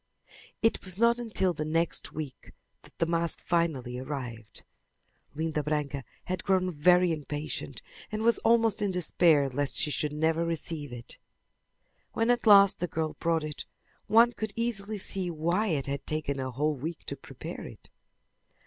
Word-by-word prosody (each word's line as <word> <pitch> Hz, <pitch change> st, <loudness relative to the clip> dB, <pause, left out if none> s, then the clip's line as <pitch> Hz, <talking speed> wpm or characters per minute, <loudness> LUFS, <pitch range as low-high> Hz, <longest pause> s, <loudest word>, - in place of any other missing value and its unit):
It 225 Hz, -, +2 dB
was 185 Hz, -1 st, -5 dB
not 235 Hz, +2 st, +4 dB
until 210 Hz, -6 st, +1 dB
the 155 Hz, -, -3 dB
next 165 Hz, +2 st, 0 dB
week 150 Hz, -4 st, -7 dB, 0.3 s
that -, -, -14 dB
the 165 Hz, -, +2 dB
mask 170 Hz, 0 st, -1 dB
finally 145 Hz, -8 st, -1 dB
arrived. 125 Hz, -6 st, -6 dB, 0.7 s
Linda 155 Hz, 0 st, -1 dB
Branca 145 Hz, -2 st, -2 dB, 0.2 s
had 185 Hz, -1 st, -3 dB
grown 185 Hz, -2 st, +2 dB
very 180 Hz, +3 st, +4 dB
impatient 150 Hz, -1 st, -4 dB, 0.3 s
and 215 Hz, +1 st, -2 dB
was 235 Hz, 0 st, +3 dB
almost 225 Hz, -2 st, +3 dB
in 205 Hz, -, +1 dB
despair 170 Hz, -5 st, +3 dB
lest 135 Hz, +1 st, -1 dB
she 150 Hz, -, 0 dB
should 150 Hz, 0 st, 0 dB
never 160 Hz, +2 st, +1 dB
receive 165 Hz, -3 st, -3 dB
it. 120 Hz, -1 st, -8 dB, 0.9 s
When 225 Hz, +2 st, +2 dB
at 240 Hz, -1 st, 0 dB
last 200 Hz, -2 st, +7 dB
the 175 Hz, -, -1 dB
girl 160 Hz, -2 st, -2 dB
brought 165 Hz, -1 st, +1 dB
it 150 Hz, -1 st, -6 dB, 0.4 s
one 230 Hz, +2 st, +6 dB
could 220 Hz, -3 st, -4 dB
easily 220 Hz, -3 st, -2 dB
see 190 Hz, -2 st, 0 dB
why 170 Hz, +6 st, 0 dB
it 150 Hz, -8 st, 0 dB
had 140 Hz, 0 st, -4 dB
taken 150 Hz, -3 st, -2 dB
a 130 Hz, 0 st, -2 dB
whole 150 Hz, +5 st, 0 dB
week 155 Hz, +5 st, -6 dB
to -, -, -5 dB
prepare -, -, -8 dB
it. -, -, -14 dB
165 Hz, 160 wpm, -29 LUFS, 150-195 Hz, 0.9 s, last